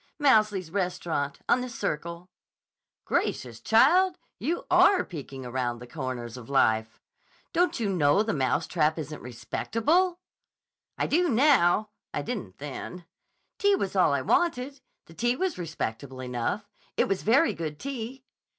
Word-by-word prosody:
"Mouseley's 215 - +3
restaurant, 175 -6 -2
on 250 - +3
the 250 - -4
Circle." 170 -3 -4 0.7
"Gracious, 120 -3 -1
child! 350 +11 +4 0.2
You 330 +8 -2
are 390 -2 +5
peeking 135 -6 -8
around 125 -1 -2
the 120 - -10
comers 125 -3 -5
of 120 -1 -11
life. 110 -5 +2 0.5
Don't 355 -4 +2
you 225 - 0
know 175 0 +3
the 220 -1 -1
Mouse 130 -3 +1
Trap 155 -2 +1
isn't 150 -1 -6
respectable?" 260 - 0 0.8
"I - - 0
do 345 +3 +2
now. 220 - +4 0.3
I - - -1
didn't 160 - -5
then. 150 +5 -7 0.5
Tea 405 0 +4
was 200 - -3
all 185 -5 +4
I 140 -2 0
wanted. 275 - 0 0.2
The 165 - -15
tea 240 +9 +1
was 370 - -2
respectable 135 -6 -5
enough. 125 - -3 0.3
It - - +3
was 195 -1 -1
very 270 +10 +4
good 155 -3 -5
tea." 260 - -6
180 Hz, 140 wpm, -27 LUFS, -, 0.8 s, are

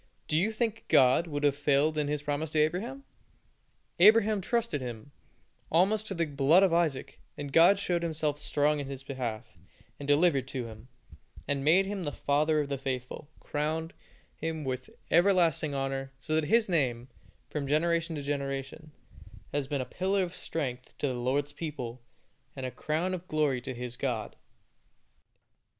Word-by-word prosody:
Do 150 - -1
you 185 +8 +2
think 225 0 -2
God 130 +6 +5
would 145 -2 -3
have 145 -1 +3
failed 145 +2 +2
in 150 -1 0
His 145 0 -2
promise 145 +2 -2
to 155 - 0
Abraham? 200 - 0 1.0
Abraham 215 +1 +6
trusted 230 - -1
Him 120 +1 -7 0.6
almost 200 +6 +3
to 195 - -3
the 170 -1 +1
blood 145 +5 +4
of 185 -3 +3
Isaac, 160 -6 0 0.2
and 145 -2 -6
God 170 +4 +7
showed 180 -3 -1
Himself 155 -3 -1
strong 150 0 +1
in 140 - -4
his 135 -1 -7
behalf, 120 -5 -5 0.4
and 140 - -7
delivered 145 -3 +3
him, 115 -3 -6 0.6
and 140 -1 -1
made 175 +6 +5
him 195 -1 -4
the 145 - -2
father 150 +2 +1
of 145 - -3
the 140 -1 -2
faithful; 130 +1 -5
crowned 160 +2 -2 0.4
him 160 -1 -4
with 130 -1 -4 0.2
everlasting 170 -5 +3
honor, 135 0 -2
so 155 +4 -5
that 160 -1 +2
his 225 +7 +3
name, 130 -9 0 0.4
from 145 -2 -4
generation 165 +3 +1
to 145 - -5
generation, 140 +2 -4 0.6
has 145 -2 -1
been 140 -2 -1
a - - -3
pillar 190 +5 0
of 175 -1 -5
strength 130 -8 -5
to 145 - -1
the - - -2
Lord's 135 +4 -1
people, 130 -7 -6 0.5
and 135 -2 -5
a 130 - -3
crown 155 +8 -1
of 180 0 -5
glory 150 -6 +1
to 130 - -5
his 125 0 -6
God. 120 -6 -3
150 Hz, 165 wpm, -29 LUFS, 135-170 Hz, 1.0 s, God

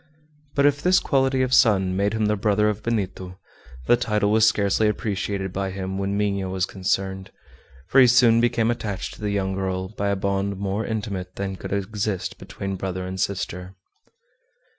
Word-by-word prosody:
But 140 - +3
if 145 0 +3
this 185 +1 +4
quality 135 -1 +1
of 130 0 -1
son 95 -7 +4
made 100 +2 +1
him 110 -1 0
the 105 0 +2
brother 105 +1 +2
of 105 0 -3
Benito, 95 -5 -3 0.5
the - - +5
title 105 -4 0
was 110 +1 +5
scarcely 105 0 +2
appreciated 100 -3 -2
by 95 +1 -2
him 95 0 -4
when 100 +1 -1
Minha 100 -2 -1
was 95 -1 0
concerned, 95 0 -2 0.6
for 135 - +5
he 125 - +7
soon 120 -2 +5
became 120 -1 +2
attached 105 -5 -4
to - - -14
the 105 - -1
young 95 -1 -1
girl 95 -1 -2
by 100 -1 -2
a 100 - +1
bond 100 0 -1
more 100 +2 -2
intimate 100 -5 -4
than 95 -1 -3
could - - -8
exist 100 -1 -2
between 95 0 -5
brother 95 0 -4
and 95 +1 -5
sister. 90 -1 -3
100 Hz, 180 wpm, -23 LUFS, 95-110 Hz, 0.6 s, he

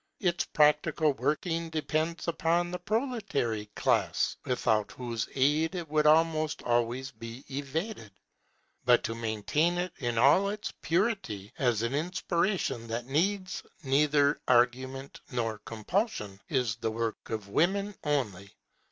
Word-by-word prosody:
Its 175 -4 +1
practical 150 0 +3
working 165 +4 -1
depends 160 +1 -1
upon 170 +1 +1
the 180 - -4
proletary 200 - -1
class, - - +1
without 110 -4 +1
whose 120 -3 -4
aid 150 +6 +2
it 175 -2 -4
would 150 0 +3
almost 155 0 +3
always 120 +2 0
be 115 +3 -9
evaded. 145 - -4 0.7
But 125 -1 +5
to 115 - -2
maintain 115 +10 0
it 180 0 -2
in 120 -3 -1
all 145 +11 +5
its 210 +1 -4
purity, 165 - -1
as 120 -4 +2
an 115 +3 -1
inspiration 170 - -1
that 115 +1 -3
needs 185 +8 0 0.2
neither 145 +1 +3
argument 130 +2 +1
nor 115 -4 -2
compulsion, 110 - -2
is 125 -6 0
the 115 -1 -1
work 115 0 -3
of 110 -3 -4
women 195 - +1
only. 105 - -2
145 Hz, 125 wpm, -29 LUFS, 115-170 Hz, 0.7 s, But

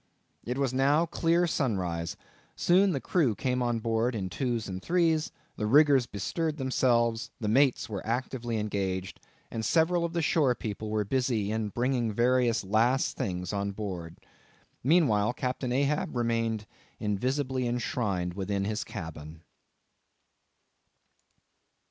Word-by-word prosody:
It 125 +2 -3
was 135 -2 0
now 140 +5 +3
clear 170 +1 +2
sunrise. 95 - -1 0.4
Soon 190 +3 +4
the 140 - -1
crew 135 - +1
came 125 +4 -1
on 120 -1 +1
board 115 +2 0
in 95 -3 -3
twos 120 -3 -2
and 95 -1 -5
threes; 165 - +1 0.3
the 105 - -1
riggers 140 0 +5
bestirred 155 - -2
themselves; 120 -4 +1
the 110 - -3
mates 125 0 +3
were 105 -4 -5
actively 120 0 -2
engaged; 95 -3 -2 0.3
and 115 - -3
several 170 +7 +2
of 170 0 -2
the 170 -1 0
shore 145 -5 +3
people 110 -1 -5
were 105 -1 0
busy 120 -3 0
in 110 -1 -1
bringing 120 0 0
various 120 0 +2
last 115 +7 +2
things 90 -1 -3
on 100 0 -2
board. 90 -5 -6 0.7
Meanwhile 125 -8 +3
Captain 125 0 -3
Ahab 140 +5 0
remained 115 -2 0 0.3
invisibly 130 +5 -1
enshrined 105 -7 -1
within 100 +1 -2
his 110 +2 -2
cabin. 80 -4 -8
120 Hz, 130 wpm, -29 LUFS, 105-135 Hz, 0.7 s, riggers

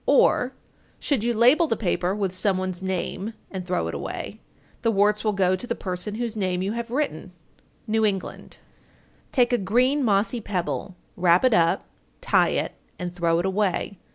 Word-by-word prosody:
Or, - - +4 0.5
should 270 -7 0
you 240 - +1
label 255 +9 +5
the 225 - 0
paper 180 -2 0
with 195 -3 -1
some 190 0 +1
one's 185 -1 -3
name 190 +3 -3 0.2
and 190 -2 -4
throw 180 0 0
it - - -4
away, - - -6 0.4
the 230 - +2
warts 210 0 +2
will 215 - +2
go 185 -2 +2
to 215 +7 -7
the 235 - -1
person 185 +2 -4
whose 230 -1 -3
name 185 -3 -1
you 195 - -1
have 235 +1 -4
written. 235 - -2 0.5
New 220 0 +1
England. 195 -3 -2 0.7
908. - - -37
Take 245 -2 +3
a - - +4
green, 255 +8 +2
mossy 220 +2 +1
pebble, 185 -1 -3 0.2
wrap 175 +3 +4
it 255 - +4
up, 170 -4 +3 0.3
tie - - +3
it, - - -1 0.2
and 180 -1 -5
throw 170 -2 +2
it 175 - 0
away. 190 -1 -1
200 Hz, 180 wpm, -24 LUFS, 185-230 Hz, 0.7 s, label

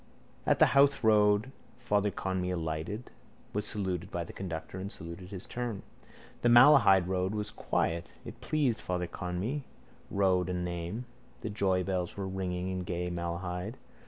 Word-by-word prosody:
At - - +4
the - - +7
Howth 140 -2 +5
road 105 +2 +4 0.3
stop - - -24
Father 105 0 +2
Conmee 95 -2 -2
alighted, 80 +7 -3 0.4
was 105 +1 0
saluted 95 -4 -2
by 85 - -2
the 85 - -10
conductor 90 0 -5
and 100 +2 -5
saluted 85 +3 -8
in - - -11
his 95 -1 -7
turn. 120 -4 -4 0.6
The 120 - +4
Malahide 120 -7 +7
road 95 +2 0
was 105 -1 -3
quiet. 85 0 -1 0.2
It 120 - -9
pleased 135 -4 +1
Father 90 -1 -1
Conmee, 90 - -3 0.5
road 95 -2 +2
and 90 -1 -1
name. 85 +7 -4 0.4
The 110 - -4
joybells 95 -3 0
were 100 -1 -3
ringing 95 -1 -2
in 95 0 -2
gay 90 -1 -3
Malahide. 90 +4 -3
95 Hz, 160 wpm, -31 LUFS, 90-105 Hz, 0.6 s, the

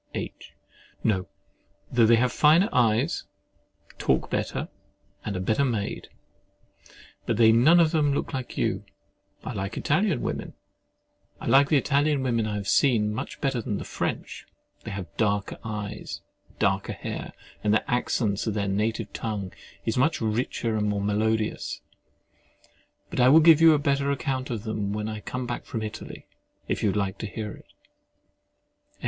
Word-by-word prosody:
H. - - -6 0.5
No: 95 -5 +1 0.6
though 120 -2 +4
they 115 - +7
have 125 +1 +2
finer 165 +8 +5
eyes, 120 +5 +2 0.7
talk - - +1
better, - - -2 0.6
and 100 -3 -3
are - - -3
better 110 +8 +1
made. 115 -7 -2 1.2
But - - +1
they 110 -1 +7
none 135 +10 +6
of 165 -2 +4
them 150 -3 +2
look 140 - -2
like 130 -2 -5
you. - - 0 0.6
I - - -5
like 95 +1 -4
the - - -4
Italian 175 - +1 2.0
women 115 -4 0
I 105 - -3
have 100 -1 -4
seen, 110 -6 +3
much 130 +6 -5
better 135 -5 0
than 105 -2 -3
the - - -5
French: - - -4 0.4
they - - -4
have 100 -3 -4
darker 105 -2 0
eyes, 105 -2 -5 0.4
darker - - 0
hair, - - -6 0.3
and 105 - +2
the 110 - +2
accents 115 -4 0
of 110 - -1
their 100 -1 -1
native 105 +2 -1
tongue 105 -4 -4 0.3
are 115 +2 +1
much 160 +6 +2
richer 115 0 -1
and 105 0 0
more 100 -1 -1
melodious. 110 +1 0 1.3
But - - -3
I 125 +1 +6
will 155 +4 +8
give 160 -1 +7
you 165 -1 +8
a - - +3
better 140 -1 +1
account 135 -2 -2
of 115 -4 -3
them 105 -3 -2
when 105 0 -3
I 110 -1 -4
come 125 +4 -5
back 120 0 -4
from 110 - -4
Italy, 110 - -7 0.4
if - - -1
you 105 - +2
would 100 - -1
like 100 -1 -2
to 110 - -4
hear 105 0 -5
it. - - -13
110 Hz, 155 wpm, -26 LUFS, 105-130 Hz, 2.0 s, will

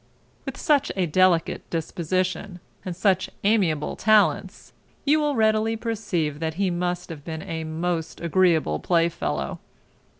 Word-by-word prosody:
With - - -5
such 295 -4 +2
a 190 -2 +1
delicate 175 +1 +2
disposition, 180 +3 -2 0.2
and 180 -2 -5
such 190 0 +1
amiable 190 -8 +1
talents, 215 -1 +2 0.3
you 300 +2 +4
will 295 -2 0
readily 220 0 +2
perceive 200 -10 -2
that 160 -1 -2
he 190 0 0
must 180 +1 -2
have 155 -4 -8
been 160 0 -6
a 160 0 -4
most 165 +1 -3
agreeable 170 - +2
play 170 -1 +2
fellow. - - -3
180 Hz, 135 wpm, -24 LUFS, 165-205 Hz, 0.3 s, you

